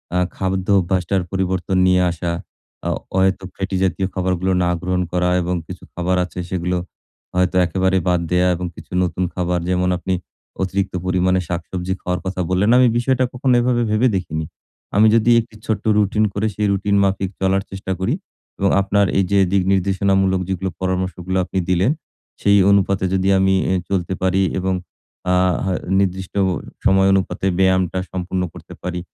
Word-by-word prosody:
আ - - +2 0.2
খাদ্য 95 -1 -2
অভ্যাসটার 95 +1 0
পরিবর্তন 95 -1 -1
নিয়ে 90 0 +4
আসা, 85 0 -3 0.6
আ - - +1 0.3
অহেতুক 95 0 +1
ফ্যাটি 95 0 -2
জাতীয় 95 0 0
খাবারগুলো 95 0 0
না 90 - +1
গ্রহণ 90 0 0
করা 90 0 +1
এবং 90 +1 -1
কিছু 90 0 -9
খাবার 90 +1 0
আছে 90 - -9
সেগুলো 90 0 -1 0.6
হয়তো 90 0 +1
একেবারে 95 +2 +1
বাদ 90 -1 +3
দেয়া 90 0 +3
এবং 90 +1 -4
কিছু - - -13
নতুন 90 +1 -1
খাবার 90 -1 -1
যেমন 90 0 +1
আপনি 95 +1 -2 0.5
অতিরিক্ত 95 +1 -1
পরিমাণে 95 0 +2
শাকসবজি 90 +1 -3
খাওয়ার 90 0 -2
কথা 95 0 -2
বললেন, 95 +4 +2
আমি 125 -1 +6
বিষয়টা 130 +1 +1
কখনো 130 +1 +1
এভাবে 120 -1 +1
ভেবে 110 +4 +3
দেখিনি। 80 -4 -3 0.5
আমি 110 +2 +6
যদি 115 +1 +4
একটি 115 -1 -7
ছোট্ট 110 - -1
রুটিন 105 +1 +2
করে 110 +2 0
সেই 105 0 0
রুটিন 100 +1 0
মাফিক 95 -1 0
চলার 95 +1 +2
চেষ্টা 95 0 -5
করি 105 +7 0 0.5
এবং 100 0 +2
আপনার 100 +1 +2
এই 95 - +4
যে 100 - +4
দিক 95 -1 +3
নির্দেশনামূলক 95 0 +1
যেগুলো 95 0 -2
পরামর্শগুলা 95 0 -1
আপনি 95 - -2
দিলেন 90 +7 +3 0.5
সেই 100 0 +5
অনুপাতে 100 -1 +2
যদি 95 0 +1
আমিই 95 0 +3
অ্যা 95 - +2
চলতে 95 -2 -1
পারি 95 +1 +2 0.2
এবং 95 0 0 0.6
আ 90 - +4 0.3
হ - - -2 0.3
নির্দিষ্ট 95 -1 -1 0.5
সময় 95 0 +4
অনুপাতে 95 0 -1
ব্যায়ামটা 95 -1 +2
সম্পূর্ণ 90 0 -2
করতে - - -12
পারি। 90 -1 -3
95 Hz, 165 wpm, -20 LUFS, 90-95 Hz, 0.6 s, আমি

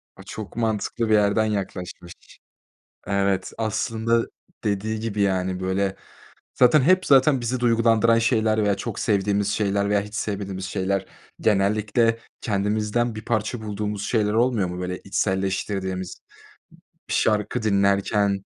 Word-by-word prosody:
A, - - -13
çok 110 -2 -8
mantıklı 110 0 -1
bir - - +4
yerden 105 +1 +3
yaklaşmış. 90 -4 -4 0.9
Evet, 100 -1 0
aslında 115 +1 0 0.4
dediği 105 +2 -1
gibi, 110 -2 -3
yani, 95 -2 0
böyle, 95 +1 -1 0.6
zaten 130 +4 +5
hep, 185 +6 +3
zaten 135 -1 +4
bizi 120 +2 -2
duygulandıran 115 -1 +3
şeyler 110 -2 +2
veya 100 -1 +2
çok 100 +2 -5
sevdiğimiz 100 -1 +1
şeyler 100 -1 0
veya 100 -1 +2
hiç 105 +1 -9
sevmediğimiz 100 -3 -3
şeyler 100 0 -1 0.3
genellikle 110 +3 +2 0.2
kendimizden 105 +3 0
bir 110 0 -8
parça 110 0 -1
bulduğumuz 105 -1 -4
şeyler 105 -3 +1
olmuyor 115 -4 +2
mu? 90 0 -6
Böyle 90 0 -4
içselleştirdiğimiz. 95 -1 -2 0.9
Bir - - -2
şarkı 110 +2 +1
dinlerken, 100 -1 +2
105 Hz, 125 wpm, -23 LUFS, 100-115 Hz, 0.9 s, zaten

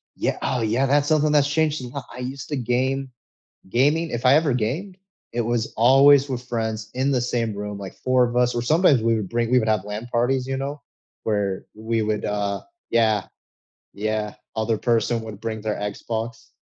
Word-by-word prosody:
yea - - -1
oh 125 - 0
yeah, 115 +5 +1
that's 145 +2 +2
something 155 -1 +3
that's 145 -1 +3
changed 155 -2 +1
a - - -5
lot. 130 +1 -7
I 125 - -9
used 130 +2 -6
to 145 - -1
game 130 +2 -1 0.6
gaming 150 - +2
if 120 - -3
I 130 +3 +7
ever 155 -3 +3
gamed, 145 - -2 0.4
it 120 - 0
was 115 0 -1
always 135 +4 +6
with 125 -2 -3
friends 110 -2 -3
in 130 +2 0
the 125 -3 +2
same 115 -3 -1
room, 105 0 -5
like 95 -1 -8
4 130 0 +2
of 120 0 -4
us, 125 0 +3
or 120 - 0
sometimes 155 0 +4
we 115 0 +2
would 105 -4 -3
bring 115 0 0
we 125 - +6
would 110 - -1
have 110 -3 +2
LAN 105 +3 -5
parties, 125 +2 +1
you 135 0 -2
know, 140 +2 -4 0.4
where 100 -3 -1
we 110 +1 -1
would, 105 0 -1
uh 100 -1 -1 0.3
yeah, 110 -4 +2 0.7
yeah. 105 0 -2 0.2
Other 110 0 0
person 115 0 +1
would 110 -3 -8
bring 110 -1 -4
their 105 0 -2
Xbox. 110 +3 -4
120 Hz, 200 wpm, -23 LUFS, 110-135 Hz, 0.7 s, I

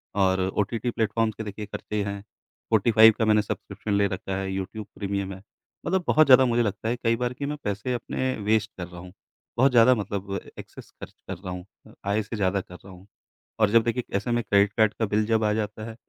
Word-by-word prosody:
और 95 -1 +2 0.2
OTT 115 +4 -1
platforms 110 -1 0
के 110 - -5
देखिए 105 0 -6
ख़र्चे 105 0 -4
हैं। 100 0 -4
स्पॉटिफाय 110 +1 +3
का 110 - -1
मैंने 105 0 +4
सब्सक्रिप्शन 105 0 -5
ले 100 0 +3
रखा 95 0 -4
है, 95 0 -3
यूट्यूब 95 +3 -5
प्रीमियम 100 -1 -3
है, 95 - -11 0.4
मतलब 190 -1 0
बहुत 155 +1 +5
ज़्यादा 130 0 +8
मुझे 120 -1 +2
लगता 105 +1 -2
है 120 - 0
कई 115 0 +3
बार 125 +1 -2
कि 140 - -5
मैं 150 +1 -3
पैसे 105 +5 -2
अपने 130 +2 -2
वेस्ट 110 0 +1
कर 90 - -5
रहा 90 -1 -11
हूँ। 90 0 -11 0.5
बहुत 130 +2 +4
ज़्यादा 120 +1 +6
मतलब 100 -2 -4 0.2
एक्सेस - - -12
ख़र्च - - -9
कर 95 -2 -5
रहा 95 0 -7
हूँ 90 0 -7 0.2
अ, - - -16 0.2
आय 105 +2 +2
से 110 +3 -6
ज़्यादा 100 -2 0
कर 90 - -13
रहा 95 +1 -13
हूँ। 90 +2 -16 0.5
और 105 - +4
जब 115 +1 +5
देखिए 120 +2 -1
ऐसे 110 +4 -3
में 120 -1 +1
क्रेडिट 100 +1 +3
कार्ड 110 -1 +4
का 110 - +2
बिल 105 +1 +1
जब 110 0 +1
आ 105 - +2
जाता 110 0 -3
है 110 - -9
105 Hz, 230 wpm, -25 LUFS, 100-115 Hz, 0.5 s, ज़्यादा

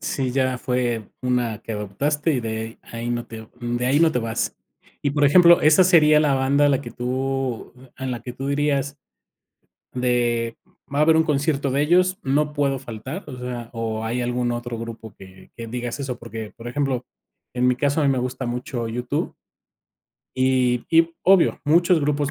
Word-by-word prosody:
Sí, 130 -2 -2
ya 130 -1 0
fue 125 -4 -1
una 125 -3 0
que 115 - -6
adoptaste 140 - -1
y 130 - 0
de 110 0 -5
ahí 115 +1 -6
ahí - - -1
no 120 -1 -2
te 110 -1 -10
de 120 +1 -2
ahí 140 +3 +3
no 165 -1 +4
te - - 0
vas. 115 -1 -2 0.5
Y 140 - +1
por 145 0 +1
ejemplo, 170 +3 +7
¿esa 155 +4 +6
sería 155 -4 +6
la 145 -3 +2
banda 140 +2 +3
a - - +4
la 135 -1 +2
que - - -8
tú 130 -1 -3 0.2
en 130 -1 -4
la 120 - -4
que 125 +2 -7
tú 135 +3 -5
dirías 140 -1 0 1.0
de: 120 -2 0 0.4
"Va 145 - 0
a - - +4
haber 160 0 +5
un 160 - +4
concierto 145 -2 0
de 140 +2 +1
ellos, 180 +4 +3
no 150 +2 +1
puedo 140 -2 0
faltar", 130 - -7
o 130 -3 -8
sea, 125 -2 -6
o 110 -1 -3
hay 120 +2 -2
algún 120 0 -1
otro 120 -1 -4
grupo 115 -1 -8
que 95 0 -15
que 115 -1 -7
digas 120 +3 -4
eso? 130 -3 -4
Porque 115 -2 -8
por 120 0 -9
ejemplo, 130 -1 -1 0.5
en 125 0 +1
mi 125 - +3
caso 145 +4 +1
a - - +2
mí - - +4
me 130 - 0
gusta 125 +1 -3
mucho 125 0 -4
U-2. 120 +2 -3 1.0
Y 130 -2 +2
y 165 0 +4
obvio, 190 -1 +4
muchos 170 +3 +4
grupos 145 -1 0
130 Hz, 195 wpm, -22 LUFS, 120-145 Hz, 1.0 s, ejemplo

